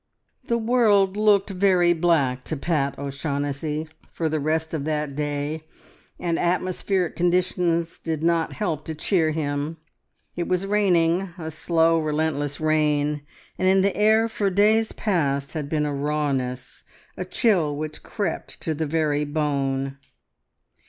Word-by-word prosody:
The 235 - +2
world 220 -5 +3
looked 210 -1 +3
very 180 -2 +3
black 155 -7 +1
to 155 - -3
Pat 140 -2 -1
O'Shaughnessy 145 +2 -3 0.2
for 160 -2 -1
the 155 0 -1
rest 160 +2 -1
of 155 -3 -2
that 150 -2 -2
day, 145 +1 -3 0.5
and 170 -2 -1
atmospheric 185 +1 0
conditions 175 -1 +1
did 160 -1 -3
not 165 -1 +1
help 165 -8 -2
to 160 - -4
cheer 160 0 +1
him. 150 0 -2 0.6
It 175 - -2
was 185 +1 0
raining, 185 -3 +2
a 160 -2 -5
slow, 165 +1 +2
relentless 150 -2 -1
rain, 150 -1 +1 0.4
and 185 - +2
in 190 0 +5
the 200 - +1
air 220 +2 +4
for 210 -3 -1
days 215 +3 +3
past 140 -9 -1
had 150 -3 -4
been 150 -1 0
a 145 - -2
rawness, 140 -3 -2 0.3
a - - -4
chill 180 - +1
which 155 +1 -5
crept 200 -7 -4
to 160 - -1
the 155 +1 -2
very 150 -1 +1
bone. 140 -2 -1
160 Hz, 140 wpm, -24 LUFS, 145-180 Hz, 0.6 s, in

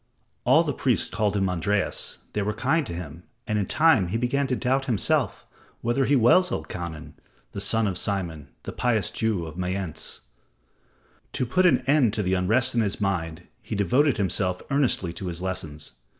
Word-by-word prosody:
All - - +5
the - - -2
priests - - +2
called 105 +1 0
him 95 -1 +1
Andreas, 90 +3 -1 0.2
they 105 - -1
were 105 +1 -2
kind 145 +3 +1
to - - -5
him, 85 -1 -8 0.2
and 105 -2 0
in 100 - -1
time 155 - +4
he 100 +6 -1
began 135 +4 0
to 130 - 0
doubt 130 +2 0
himself 115 -7 0 0.4
whether 120 +3 +1
he 145 - +3
was 135 +10 +5
Elkanan, 85 - -6 0.4
the 100 - -5
son 110 +2 +2
of 95 -3 0
Simon, 85 -8 -2 0.2
the - - -5
pious 115 -3 0
Jew 110 -7 -1
of 80 +2 -8
Mayence. 90 -2 -3 1.1
To 130 - 0
put 180 +10 +3
an 175 - +3
end 135 -7 +3
to 105 - -1
the 95 0 0
unrest 110 +8 +2
in 120 - +2
his 100 -3 -1
mind, 85 -4 -2 0.2
he 110 - -5
devoted 125 - +2
himself 95 -2 0
earnestly 125 -11 +1
to 90 +2 -6
his 85 -1 -4
lessons. 80 -5 -4
100 Hz, 180 wpm, -25 LUFS, 90-125 Hz, 1.1 s, All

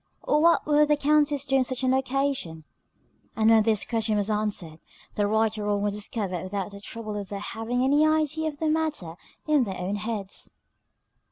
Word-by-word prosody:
Or 300 - +2
what 335 +1 +4
would 300 0 +4
the 295 0 +3
Countess 290 -1 +2
do 270 -1 +2
on 265 - +3
such 255 0 -3
an 260 0 +3
occasion? 265 - -1 0.7
And 220 0 +4
when 225 -1 +6
this 215 -1 +1
question 220 -2 0
was 205 +1 0
answered, 205 -7 -1 0.3
the 205 -1 0
right 220 +1 +1
or 205 - -3
wrong 205 -1 0
was 205 -1 0
discovered 205 -4 -3
without 195 +1 -4
the 200 0 -11
trouble 215 0 -6
of 200 -2 -6
their 200 - -4
having 230 +4 -3
any 285 +3 +4
idea 310 0 +1
of 295 - -10
the 315 - -1
matter 310 - -1 0.3
in 300 -2 +3
their 190 -5 -5
own 190 +3 -3
heads. 205 -2 -5
225 Hz, 195 wpm, -26 LUFS, 205-285 Hz, 0.7 s, when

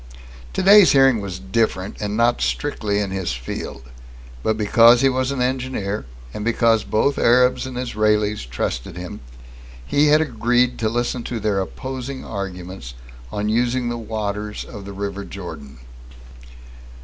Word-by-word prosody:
Today's 200 - +6
hearing 135 -5 +5
was 95 -3 -5
different, 95 0 -1
and 105 0 -2
not 120 +1 +2
strictly 110 -8 -1
in 100 -2 -1
his 95 -8 -2
field. - - -6 0.6
But 110 - 0
because 115 +3 +6
he 135 - +5
was 130 0 0
an 135 -3 -1
engineer, 125 - -2 0.3
and 105 - -5
because 115 -1 +2
both 135 +6 +1
Arabs 125 +2 +3
and 130 -1 -7
Israelis 105 - 0
trusted 60 +7 -3
him, 90 +4 -7 0.7
he 145 - +3
had 150 +1 +5
agreed 125 -3 +1
to 110 - +1
listen 120 +2 -1
to 120 - -3
their 105 -2 0
opposing 130 +5 -6
arguments 90 - -6 0.4
on 105 +6 -2
using 120 +2 +1
the 120 - -3
waters 105 -1 -4
of 100 -5 -9
the 100 - -7
River 100 0 -4
Jordan. 85 -9 -9
110 Hz, 145 wpm, -21 LUFS, 100-125 Hz, 0.7 s, Today's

